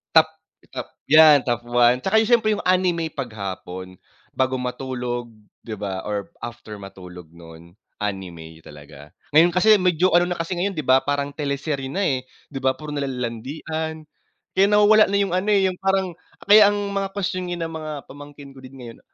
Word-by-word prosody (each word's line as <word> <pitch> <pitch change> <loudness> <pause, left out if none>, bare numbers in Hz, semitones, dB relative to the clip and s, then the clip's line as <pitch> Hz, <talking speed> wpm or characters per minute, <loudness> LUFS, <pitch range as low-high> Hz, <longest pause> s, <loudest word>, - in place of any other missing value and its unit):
Top 160 0 +8 0.5
top - - -5 0.2
'yan, 155 -2 +7
top 120 -2 -1
1. 120 +1 +3
'Tsaka 190 +8 +1
yung 220 0 0
siyempre 230 -3 +3
'yung 210 - -5
anime 180 -3 +1
'pag 135 -4 -5
hapon, 95 -1 -7 0.4
bago 130 0 0
matulog, 125 -1 -4 0.3
'di 110 - -7
ba, 95 -2 -4
or 105 -1 -4
after 120 -2 -8
matulog 90 -3 -11
noon, 85 +1 -15 0.2
anime 90 -6 -6
talaga. 75 0 -14 0.2
Ngayon 165 +3 +6
kasi, 210 +4 +5
medyo 180 -1 +2
ano 175 0 +5
na - - -9
kasi 165 +2 -3
ngayon 195 +3 -1
'di 155 -3 -4
ba, 130 +1 +5
parang 145 0 -1
teleserye 140 -1 -3
na, 195 - -1
eh. 130 -7 -1 0.2
'Di 145 - -7
ba, 130 0 +1
puro 150 +3 -10
nalang 135 -3 -3
landian, 155 +7 -5 0.5
kaya 195 - +4
nawawala 210 +1 +6
na 200 - +1
'yung 195 -3 0
ano, 185 +3 -1
eh, 200 - +4
'yung 185 - -6
parang, 190 -1 +1 0.3
kaya 205 0 +7
ang - - -2 0.2
mga 195 0 -1
kwestyon 185 -2 -3
ng 165 -2 -4
mga 155 -1 -6 0.2
pamangkin 145 0 -12
ko - - -12
din 130 +1 -12
ngayon, 115 -1 -10
140 Hz, 180 wpm, -22 LUFS, 115-180 Hz, 0.5 s, Top